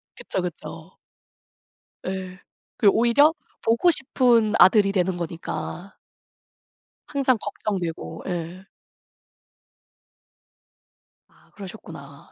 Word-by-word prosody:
그쵸, 475 Hz, -, -3 dB
그쵸. 165 Hz, 0 st, -8 dB, 1.1 s
예. 185 Hz, -1 st, -5 dB, 0.4 s
그리고 205 Hz, -1 st, +4 dB
오히려 280 Hz, +7 st, +5 dB, 0.3 s
보고 230 Hz, +10 st, +3 dB
싶은 245 Hz, -6 st, +2 dB
아들이 195 Hz, +1 st, +6 dB
되는 190 Hz, -2 st, 0 dB
거니까. 175 Hz, +2 st, -6 dB, 1.1 s
항상 270 Hz, -3 st, +1 dB
걱정되고 195 Hz, -5 st, -4 dB
예. 175 Hz, +2 st, -5 dB, 2.6 s
아, -, -, -27 dB
그러셨구나. 160 Hz, -8 st, -11 dB
190 Hz, 175 characters per minute, -24 LUFS, 175-230 Hz, 2.6 s, 아들이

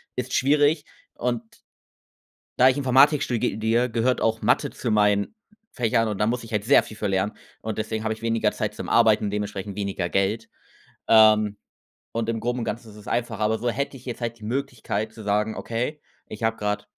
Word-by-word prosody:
ist 125 Hz, 0 st, -4 dB
schwierig. 145 Hz, +3 st, +3 dB, 0.3 s
Und 120 Hz, -1 st, -1 dB, 1.1 s
da 130 Hz, -, +6 dB
ich 130 Hz, -, 0 dB
Informatik 140 Hz, +2 st, +4 dB
studiere 115 Hz, 0 st, 0 dB
gehört 120 Hz, +2 st, +1 dB
auch 110 Hz, 0 st, +1 dB
Mathe 105 Hz, -, +2 dB
zu 120 Hz, -, -4 dB
meinen 105 Hz, -, +2 dB, 0.4 s
Fächern 115 Hz, -1 st, +1 dB
und 105 Hz, -2 st, -3 dB
da 105 Hz, -, +3 dB
muss 120 Hz, +1 st, -1 dB
ich 115 Hz, -, -11 dB
halt 105 Hz, -1 st, 0 dB
sehr 110 Hz, -, +6 dB
viel 110 Hz, -, -10 dB
für 105 Hz, -, -2 dB
lernen. 95 Hz, +2 st, 0 dB, 0.3 s
Und 110 Hz, -1 st, -4 dB
deswegen 110 Hz, 0 st, -3 dB
habe 110 Hz, -, 0 dB
ich 110 Hz, -, -13 dB
weniger 115 Hz, 0 st, +1 dB
Zeit -, -, -3 dB
zum -, -, -7 dB
Arbeiten 110 Hz, -2 st, +4 dB
und 100 Hz, -, -2 dB
dementsprechend 105 Hz, -1 st, -4 dB
weniger 100 Hz, -3 st, -2 dB
Geld. 95 Hz, +4 st, 0 dB, 0.6 s
Ähm, 110 Hz, -2 st, +6 dB, 0.6 s
und 115 Hz, 0 st, -2 dB
im 115 Hz, -1 st, -1 dB
Groben 120 Hz, +2 st, -2 dB
und 115 Hz, -, -3 dB
Ganzen 115 Hz, 0 st, -5 dB
ist 105 Hz, -, -14 dB
es 105 Hz, -1 st, -14 dB
einfacher, 115 Hz, -3 st, -2 dB
aber 110 Hz, +1 st, +1 dB
so 120 Hz, +2 st, 0 dB
hätte 140 Hz, +3 st, -3 dB
ich 125 Hz, -, -17 dB
jetzt 125 Hz, -1 st, -6 dB
halt 115 Hz, 0 st, -4 dB
die -, -, -14 dB
Möglichkeit 115 Hz, -3 st, -3 dB
zu 110 Hz, -, -11 dB
sagen: 105 Hz, +1 st, 0 dB
"Okay, 125 Hz, +7 st, -3 dB, 0.3 s
ich 110 Hz, -, -9 dB
habe 110 Hz, 0 st, +1 dB
grade 105 Hz, 0 st, -2 dB
110 Hz, 200 wpm, -24 LUFS, 105-120 Hz, 1.1 s, da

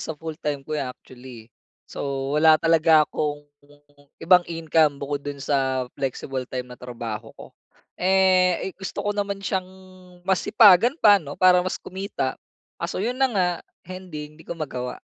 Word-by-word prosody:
sa 160 Hz, -, -5 dB
fulltime 150 Hz, -3 st, -5 dB
ko, 155 Hz, -, -7 dB
eh, 150 Hz, -, -1 dB
actually. 125 Hz, -3 st, -10 dB, 0.3 s
So, 135 Hz, 0 st, -4 dB
wala 155 Hz, +1 st, +6 dB
talaga 160 Hz, -1 st, +4 dB
akong 145 Hz, 0 st, -3 dB, 0.7 s
ibang 180 Hz, +2 st, +5 dB
income, 160 Hz, -3 st, +1 dB
bukod 140 Hz, +1 st, -4 dB
dun 145 Hz, 0 st, -6 dB
sa 135 Hz, -2 st, 0 dB
flexible 130 Hz, -1 st, -4 dB
time 130 Hz, -1 st, -4 dB
na -, -, -14 dB
trabaho 115 Hz, -3 st, -6 dB
ko. -, -, -13 dB, 0.5 s
Eh, 185 Hz, 0 st, +3 dB
gusto 190 Hz, -, -5 dB
ko 205 Hz, -, 0 dB
naman 200 Hz, -1 st, -3 dB
siyang 185 Hz, -1 st, -2 dB, 0.6 s
mas 190 Hz, -1 st, +1 dB
sipagan 220 Hz, -, +5 dB
pa 205 Hz, -, +6 dB
'no 145 Hz, -2 st, -9 dB
para 180 Hz, -1 st, +5 dB
mas 185 Hz, -, -2 dB
kumita. 195 Hz, +2 st, -4 dB, 0.4 s
Kaso -, -, -3 dB
'yon 250 Hz, +2 st, -2 dB
na 265 Hz, -, +4 dB
nga, 185 Hz, -3 st, +2 dB, 0.4 s
ending 155 Hz, -5 st, -8 dB
hindi 160 Hz, -, -16 dB
ko -, -, -2 dB
magawa. 125 Hz, -5 st, -5 dB
155 Hz, 155 wpm, -23 LUFS, 140-185 Hz, 0.7 s, wala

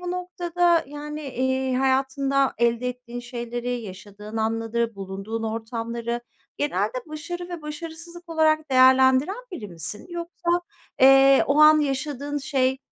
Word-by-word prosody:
bu 360 Hz, 0 st, -4 dB
noktada, 350 Hz, -1 st, +1 dB
yani, 300 Hz, +1 st, -7 dB
iii, 260 Hz, 0 st, -1 dB
hayatında 270 Hz, +1 st, +1 dB
elde 235 Hz, +1 st, +1 dB
ettiğin 245 Hz, -1 st, -7 dB
şeyleri, 240 Hz, 0 st, -5 dB
yaşadığın 205 Hz, +2 st, -9 dB
anları, 225 Hz, +1 st, -1 dB
bulunduğun 195 Hz, +3 st, -5 dB
ortamları 230 Hz, +1 st, -3 dB, 0.4 s
genelde 215 Hz, -8 st, -1 dB, 0.2 s
başarı 350 Hz, +3 st, -6 dB
ve 345 Hz, -3 st, -7 dB
başarısızlık 335 Hz, +3 st, -8 dB
olarak 315 Hz, -2 st, +2 dB
değerlendiren 260 Hz, -, +4 dB
biri 220 Hz, -, -7 dB
misin 170 Hz, -, -6 dB
yoksa, 345 Hz, 0 st, -6 dB, 0.5 s
eee, 270 Hz, +1 st, +7 dB
o 285 Hz, +2 st, +3 dB
an 305 Hz, 0 st, +8 dB
yaşadığın 285 Hz, +1 st, -2 dB
şey, 265 Hz, -2 st, 0 dB
265 Hz, 120 wpm, -24 LUFS, 235-310 Hz, 0.5 s, an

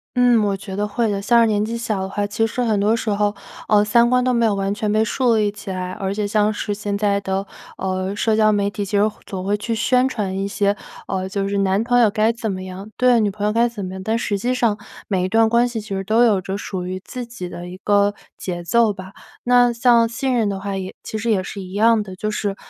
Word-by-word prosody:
嗯， 245 Hz, -2 st, +4 dB
我 200 Hz, -1 st, 0 dB
觉 195 Hz, -1 st, -8 dB
得 210 Hz, +1 st, -1 dB
会 230 Hz, +3 st, 0 dB
的。 200 Hz, -, -2 dB
像 235 Hz, +3 st, +4 dB
是 -, -, +4 dB
年 210 Hz, -1 st, +1 dB
纪 230 Hz, +2 st, -3 dB
小 220 Hz, -4 st, -2 dB
的 190 Hz, -, -3 dB
话， 205 Hz, +1 st, -2 dB
其 205 Hz, +2 st, 0 dB
实 250 Hz, +3 st, -2 dB
很 220 Hz, -4 st, +1 dB
多 210 Hz, +3 st, +3 dB
时 220 Hz, -2 st, -2 dB
候， 205 Hz, 0 st, +1 dB, 0.3 s
呃， 210 Hz, -1 st, +4 dB
三 235 Hz, +2 st, +4 dB
观 250 Hz, 0 st, +3 dB
都 255 Hz, -, +1 dB
没 235 Hz, -1 st, +2 dB
有 215 Hz, -3 st, +2 dB
完 195 Hz, 0 st, -1 dB
全 210 Hz, 0 st, -2 dB
被 215 Hz, +1 st, +2 dB
树 240 Hz, 0 st, +1 dB
立 210 Hz, -1 st, +2 dB
起 205 Hz, 0 st, -10 dB
来。 185 Hz, -1 st, -3 dB
而 195 Hz, 0 st, -3 dB
且 210 Hz, 0 st, -2 dB
像 210 Hz, 0 st, +2 dB
是 205 Hz, -1 st, -3 dB
现 205 Hz, 0 st, -3 dB
在 200 Hz, -1 st, +1 dB
的， 190 Hz, 0 st, -2 dB, 0.3 s
呃， 185 Hz, +1 st, -2 dB
社 215 Hz, +1 st, +1 dB
交 215 Hz, -1 st, +4 dB
媒 200 Hz, -1 st, +1 dB
体 205 Hz, +1 st, -3 dB
其 200 Hz, +1 st, -1 dB
实 205 Hz, -, +4 dB
会 215 Hz, -, -8 dB
总 185 Hz, -1 st, -5 dB
会 200 Hz, +1 st, +1 dB
去 225 Hz, +2 st, -3 dB
宣 250 Hz, +3 st, +2 dB
传 200 Hz, -6 st, -3 dB
一 195 Hz, +1 st, -2 dB
些， 200 Hz, 0 st, +1 dB, 0.3 s
呃， 190 Hz, -1 st, -2 dB
就 195 Hz, 0 st, -2 dB
是 200 Hz, 0 st, -1 dB
男 195 Hz, +2 st, +1 dB
朋 245 Hz, +1 st, +3 dB
友 230 Hz, -, +5 dB
该 215 Hz, +2 st, +2 dB
怎 225 Hz, -2 st, -3 dB
么 185 Hz, -1 st, -5 dB
样， 190 Hz, +2 st, -8 dB
对， 250 Hz, -1 st, +4 dB
女 210 Hz, -2 st, +2 dB
朋 205 Hz, +1 st, -4 dB
友 210 Hz, -, +1 dB
该 235 Hz, +1 st, +3 dB
怎 210 Hz, -5 st, -6 dB
么 185 Hz, -, -6 dB
样， 190 Hz, -, -6 dB
但 220 Hz, +3 st, 0 dB
实 205 Hz, -3 st, -2 dB
际 245 Hz, +5 st, 0 dB
上 230 Hz, -4 st, +1 dB, 0.3 s
每 185 Hz, -3 st, 0 dB
一 -, -, -2 dB
段 225 Hz, +2 st, +4 dB
关 235 Hz, +2 st, +3 dB
系 235 Hz, -2 st, -4 dB
其 215 Hz, -, -10 dB
实 195 Hz, -1 st, -2 dB
都 220 Hz, +5 st, +3 dB
有 210 Hz, -5 st, +3 dB
着 190 Hz, +1 st, -4 dB
属 185 Hz, -3 st, -5 dB
于 185 Hz, 0 st, -4 dB
自 250 Hz, -1 st, -6 dB
己 225 Hz, -6 st, -7 dB
的 175 Hz, 0 st, -8 dB
一 180 Hz, +1 st, -8 dB
个 205 Hz, +1 st, +2 dB, 0.2 s
节 175 Hz, -2 st, -5 dB
奏 230 Hz, +4 st, +3 dB
吧。 190 Hz, -1 st, -9 dB, 0.3 s
那 245 Hz, 0 st, +4 dB
像 235 Hz, -1 st, +4 dB
信 255 Hz, +3 st, -1 dB
任 225 Hz, -4 st, +1 dB
的 195 Hz, -, -3 dB
话 200 Hz, 0 st, -4 dB
也 190 Hz, -1 st, -5 dB
其 220 Hz, -, -5 dB
实 230 Hz, +2 st, -2 dB
也 200 Hz, -4 st, +2 dB
是 195 Hz, +1 st, -7 dB
一 185 Hz, 0 st, -9 dB
样 225 Hz, +1 st, +4 dB
的， 190 Hz, -3 st, -8 dB
就 215 Hz, +3 st, -3 dB
是， 205 Hz, -1 st, -2 dB
210 Hz, 295 characters per minute, -21 LUFS, 195-230 Hz, 0.3 s, 友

